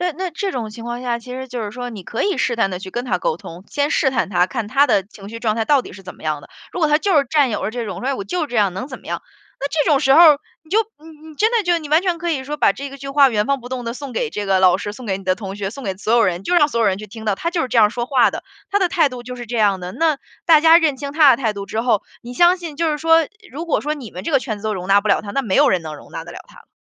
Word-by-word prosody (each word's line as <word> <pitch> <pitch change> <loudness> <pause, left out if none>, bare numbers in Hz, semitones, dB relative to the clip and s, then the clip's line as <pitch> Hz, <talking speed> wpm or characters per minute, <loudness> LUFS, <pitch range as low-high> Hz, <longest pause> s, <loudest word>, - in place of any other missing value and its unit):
那 360 -2 0
那 370 +3 -4
这 385 +4 -3
种 230 -4 -4
情 230 +2 -10
况 240 +1 -5
下， 240 -2 -1
其 250 +2 -10
实 260 +1 -6
就 245 -1 -5
是 205 - -4
说， 245 +1 -6
你 210 -5 -8
可 230 - -3
以 400 -2 0
试 240 - +1
探 225 -4 +1
地 180 - -4
去 190 - -9
跟 240 +5 -3
他 195 -8 -1
沟 160 - -1
通， 175 +2 -11
先 290 0 -1
试 270 - +2
探 240 -6 0
他， 180 -2 +2
看 220 +1 -4
他 280 +5 +4
的 205 -6 +2
情 200 0 -13
绪 230 +2 -8
状 220 -2 0
态 225 - 0
到 280 +2 +3
底 - - -11
是 195 - -12
怎 180 - -9
么 - - -18
样 155 -2 -2
的。 - - -14 0.2
如 - - -5
果 310 - +3
他 300 +1 +4
就 385 -1 +1
是 280 - +1
占 290 -5 +3
有 210 - -3
着 205 - -1
这 240 -1 -3
种 190 -4 -5
说： 250 - -5
“哎， 275 - 0
我 225 - -4
就 315 - -2
这 245 - -10
样， 205 -3 +3
能 195 +7 -4
怎 255 - -9
么 - - -18
样。” - - -3 0.4
那 280 - -1
这 310 +1 +1
种 285 - +5
时 270 +1 +4
候 325 - +7
儿 310 -4 +8 0.2
你 315 - -24
就 420 - +3 0.3
你 315 -1 -13
真 435 +2 +3
的 460 -3 +2
就 350 -1 +2
你 310 -3 -9
完 310 +2 +4
全 360 -3 0
可 345 +1 -2
以 270 -5 -2
说 295 +3 -4
把 - - +3
这 280 0 -7
个 275 - -9
句 275 - -8
话， 275 0 +5
原 210 -3 +1
封 275 -1 0
不 245 - -10
动 255 -1 -5
地 230 - -3
送 275 -1 -7
给 480 -3 -2
这 205 - -4
个 190 -1 +2
老 185 -1 +5
师、 205 - -5
送 245 +4 -10
给 195 -2 -1
你 195 - -12
的 185 - +2
同 195 -1 -7
学、 200 -1 -3
送 275 +6 -9
给 195 -3 -2
所 215 +3 -2
有 235 - +5
人， 180 +1 -1
就 360 - 0
让 295 -4 +5
所 235 -5 -2
有 225 - +3
人 190 - +2
去 215 - -8
听 220 +2 -10
到， 210 - +1
他 335 - -2
就 345 -1 -1
是 - - -1
这 240 - -2
样 210 -2 +6
说 240 +1 -3
话 260 -2 +4
的， - - -7 0.3
他 405 - +2
的 375 -3 +2
态 330 -4 +3
度 250 -2 -8
就 250 - -7
是 240 - -8
这 240 +2 -4
样 200 -3 +2
的。 180 0 -6
那 315 +4 +1 0.3
大 320 -3 +7
家 325 +1 +7
认 310 -5 +1
清 280 +1 -5
他 300 -3 +6
的 245 - +5
态 220 -3 +1
度 200 -1 -7
之 220 - -2
后， 230 -4 +1 0.2
你 240 - -8
相 345 +6 +5
信 330 -4 -7
就 330 0 +1
是 295 - -3
说 325 0 +4 0.3
如 320 +6 -6
果 330 - +1
说 300 +2 -2
你 260 -8 -10
们 180 - -7
这 - - -2
个 275 - +5
圈 220 -5 -4
子 200 - -15
都 215 -1 -1
容 180 -1 -5
纳 200 +1 +5
不 215 - -3
了 195 - +3
他， 205 -1 -7
那 275 - 0
没 205 -7 -1
有 290 0 +5
人 180 -5 +1
能 155 -1 -7
容 - - -15
纳 - - -5
得 - - -10
了 - - -8
他 - - -18
了。 - - -21
250 Hz, 390 characters per minute, -20 LUFS, 210-300 Hz, 0.4 s, 儿